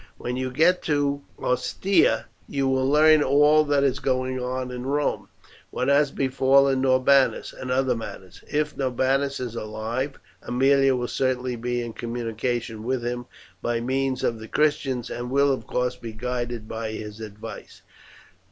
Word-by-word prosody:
When 125 - -4
you 130 0 -2
get 165 +8 +3
to 145 -2 0 0.2
Ostia 185 +9 +1 0.2
you 135 -1 0
will 130 0 +1
learn 155 +1 +6
all 150 +2 +5
that 145 -1 +2
is 135 0 +1
going 130 -1 -1
on 125 0 -3
in 125 0 -5
Rome, 145 +1 -1 0.4
what 125 +2 -1
has 145 +1 +4
befallen 135 0 +3
Norbanus, 130 +1 +3
and 130 - -7
other 130 -1 +1
matters. 95 -4 -9
If 150 0 0
Norbanus 135 +2 0
is 125 -3 -4
alive, 115 +5 -4 0.2
Aemilia 135 +1 +3
will 120 0 -2
certainly 130 -1 -1
be 120 +1 -2
in 115 -1 -6
communication 115 -1 -3
with 120 +1 -2
him 120 0 -3 0.3
by 120 -1 -1
means 130 +2 -1
of 115 - 0
the 110 - -9
Christians, 135 -5 0
and 120 0 -4
will, 140 +1 +3
of 115 -5 -6
course, 125 0 -1
be 115 -2 -8
guided 120 -1 -4
by 110 0 -4
his 105 0 -7
advice." 105 -1 -9
130 Hz, 155 wpm, -24 LUFS, 120-140 Hz, 0.4 s, learn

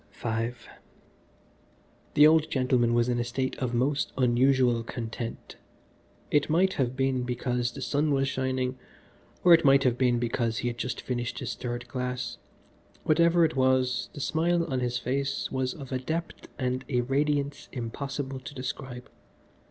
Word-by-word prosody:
V 115 0 -2 1.7
The 150 - +8
old 155 0 +5
gentleman 125 -4 +2
was 120 0 +3
in 120 -1 0
a - - +1
state 130 +2 -2
of 125 -2 -1
most 140 +4 +1
unusual 125 -1 +3
content. 115 0 -6 0.7
It 145 0 +2
might 185 +4 +3
have 130 -2 -1
been 135 -1 +1
because 125 0 -1
the 135 +1 -7
sun 150 +3 +1
was 135 -1 +2
shining, 130 -1 -1 0.6
or 175 - +8
it 165 0 +6
might 135 -1 +6
have 125 -2 +1
been 125 -2 +3
because 115 -1 -1
he 120 - -1
had 120 0 -7
just 120 0 -3
finished 120 -2 -3
his 125 -2 -3
third 120 0 -5
glass: 125 +1 -4 0.6
whatever 170 +2 +4
it 160 - -2
was, 130 -1 +2
the 145 - -7
smile 170 +6 +1
upon 135 -6 -2
his 125 -1 -1
face 135 +3 -2
was 130 -1 -1
of 140 -3 -9
a 130 - -1
depth 165 +6 -4
and 130 -1 -1
a 125 -3 +2
radiance 140 +2 -1
impossible 135 +2 -4
to 130 +3 -10
describe. 130 -1 -6
130 Hz, 160 wpm, -28 LUFS, 120-140 Hz, 1.7 s, The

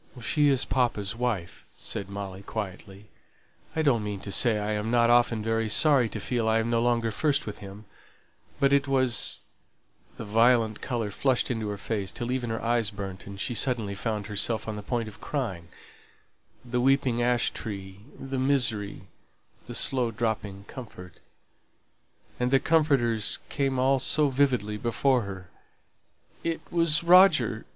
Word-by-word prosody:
"She 145 +5 +1
is 135 -2 +3
papa's 115 -5 -1
wife," 115 -8 -3
said 100 -1 -5
Molly, 100 -1 -6
quietly. 100 -1 -7 0.7
"I 160 - +1
don't 120 -7 +2
mean 105 -1 -4
to 100 - -6
say 115 +1 +4
I'm 105 +1 -2
not 120 0 +3
often 120 -2 +3
very 115 0 0
sorry 135 -1 +4
to - - -6
feel 115 -3 -1
I'm 115 +1 +1
no 115 -1 +2
longer 120 -1 +1
first 145 +5 0
with 105 - -6
him; 100 +2 -11 0.7
but 140 0 +3
it 140 0 +3
was" 130 -3 +1 0.7
the 115 - -7
violent 115 0 +3
colour 115 -5 -3
flushed 130 +4 +1
into 110 -3 -3
her 100 - -4
face 100 -1 -3
till 120 +1 -4
even 125 -2 -2
her 110 0 -2
eyes 115 -2 +1
burnt, 100 -2 -7
and 100 0 -9
she 120 - -2
suddenly 115 -3 0
found 105 0 -3
herself 105 +2 0
on 110 - -3
the 105 - -6
point 115 +1 -2
of 110 0 -12
crying; 105 - -4 1.0
the 125 0 -1
weeping 130 -2 +2
ash 120 0 +2
tree, 95 -3 -7 0.2
the 135 -1 -4
misery, 115 - 0 0.7
the - - -6
slow 125 -3 +2
dropping 105 -3 -3
comfort, 95 - -11 1.2
and 125 0 +1
the 135 +1 +4
comforter 140 -9 +2 0.3
came 135 -3 -1
all 135 +1 +3
so 150 +3 +2
vividly 125 -6 +1
before 125 +4 +1
her 95 -4 -8 0.9
"it 165 -1 -2
was 165 -2 +3
Roger!" 170 - +5
115 Hz, 155 wpm, -27 LUFS, 105-130 Hz, 1.2 s, Roger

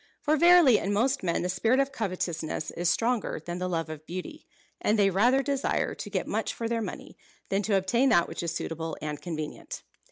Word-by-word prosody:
For 305 0 +2
verily 340 -7 +6
in 200 - -2
most 260 +6 +1
men 170 -2 0
the - - 0
spirit 225 +8 +2
of 275 0 +1
covetousness 180 - -3
is 175 0 0
stronger 230 +1 0
than 175 +3 -6
the 185 - -2
love 165 -2 -1
of 155 0 -9
beauty, 185 - -7 0.3
and 215 - +2
they 200 -1 +4
rather 245 +8 +3
desire 275 0 0
to - - -7
get - - -2
much - - -2
for 230 - -3
their 230 0 -1
money, - - -7 0.3
than 195 +1 +1
to 205 -1 +2
obtain 235 +8 +2
that 170 -6 +4
which - - -5
is 170 -1 -2
suitable 165 0 -4
and 150 -1 -5
convenient." 155 -3 -6
195 Hz, 210 wpm, -28 LUFS, 170-250 Hz, 0.3 s, verily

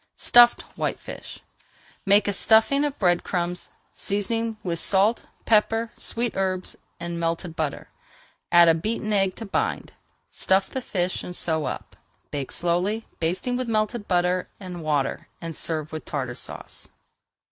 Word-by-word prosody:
STUFFED 240 0 +6
WHITEFISH - - -5 0.7
Make 200 +1 +6
a 205 - +1
stuffing 225 +8 +4
of 290 -1 -2
bread 175 -3 +2
crumbs, 180 -1 -3 0.2
seasoning 225 +3 -2
with 170 -3 -2
salt, 200 +5 +3 0.2
pepper, 225 +1 +3
sweet 235 0 -1
herbs, 185 -1 -1 0.2
and 170 0 -4
melted 165 0 -2
butter. 155 -4 -3 0.6
Add 175 0 +8
a 165 - +7
beaten 215 +5 -2
egg 195 -2 +2
to 225 - -7
bind, 200 - -2 0.4
stuff 190 +1 +1
the 260 - -3
fish, 185 -6 -2
and 180 - -6
sew 160 -3 0
up. - - -5 0.4
Bake 140 -2 -4
slowly, 180 +6 0
basting 185 +9 -1
with 255 -2 -3
melted 215 0 -1
butter 180 0 +1
and 180 -3 -7
water, 150 -3 -1
and 165 -2 -6
serve 155 -1 -3
with 155 - -5
Tartar 130 -4 -3
Sauce. - - -7
185 Hz, 145 wpm, -25 LUFS, 170-220 Hz, 0.7 s, Add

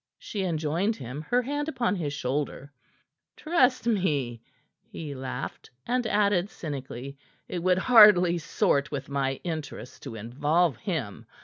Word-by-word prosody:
she 205 - -5
enjoined 170 +5 0
him, 130 - -7
her 245 +1 +3
hand 290 +4 -2
upon 240 -8 0
his 155 -6 -2
shoulder. 140 0 -3 0.7
"Trust 270 -7 +2
me," 150 - 0 0.4
he 150 -3 -8
laughed, 130 -1 -6 0.2
and 250 -1 0
added 205 -3 +2
cynically: 140 - -7 0.3
"It 175 - -4
would 180 +1 +3
hardly 190 -6 +7
sort 140 -3 +1
with 140 -2 -5
my 135 -1 -1
interests 155 -6 -6
to 130 -5 -8
involve 145 +7 +1
him. 135 - -4
160 Hz, 130 wpm, -27 LUFS, 140-205 Hz, 0.7 s, hardly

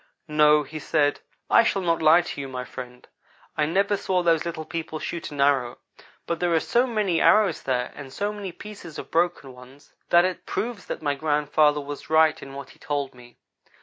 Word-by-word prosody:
"No," 150 -1 +4
he 155 +1 -8
said, 145 -1 +1 0.3
"I - - +6
shall 200 -4 0
not 165 -2 +1
lie 160 +2 +6
to 165 -4 -6
you, 135 - -5
my 130 -1 -5
friend. 125 +1 -10 0.5
I 150 - +1
never 200 +5 +1
saw 185 -2 0
those 165 -2 +2
little 160 -2 -5
people 160 -1 -5
shoot 170 +2 -5
an 145 - -9
arrow, 135 -4 +2 0.5
but 170 -1 -2
there 175 -1 0
are - - +4
so 240 +9 +1
many 210 -8 0
arrows 215 -2 +4
there, 125 -2 -1
and 140 -2 -10
so 205 +8 -2
many 200 -3 -6
pieces 180 -4 -10
of - - -8
broken 165 -6 0
ones, 125 +3 -16 0.2
that 175 +1 +6
it 185 -1 -4
proves 230 -4 -4
that - - -5
my 145 -1 +1
grandfather 150 0 +2
was 145 +1 -8
right 160 0 +4
in 135 - -10
what 140 -1 -8
he - - -21
told 145 -3 -3
me. 120 -1 -17
155 Hz, 205 wpm, -25 LUFS, 140-175 Hz, 0.5 s, I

